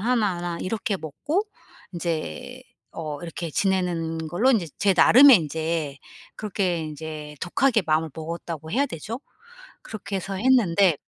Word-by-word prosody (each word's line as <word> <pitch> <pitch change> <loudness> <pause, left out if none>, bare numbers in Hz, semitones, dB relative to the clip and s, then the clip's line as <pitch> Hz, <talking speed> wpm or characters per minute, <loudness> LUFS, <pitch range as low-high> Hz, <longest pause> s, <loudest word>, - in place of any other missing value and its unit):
하나나 195 -7 0
이렇게 205 0 -2
먹고 185 - -2 0.5
인제 165 - -4 0.3
어 150 -3 -6
이렇게 170 0 -5
지내는 165 -3 0
걸로 220 +11 +3
인제 215 -9 +2
제 195 -1 +3
나름의 265 +4 +9
인제 160 -2 -2 0.4
그렇게 190 -4 -1
인제 155 -1 -7
독하게 225 +5 +2
마음을 155 +1 +1
먹었다고 160 -1 -6
해야 280 +6 +2
되죠. 225 - -6 0.6
그렇게 200 -2 -5
해서 195 +1 -5
했는데 200 - +4
175 Hz, 290 characters per minute, -24 LUFS, 160-210 Hz, 0.6 s, 나름의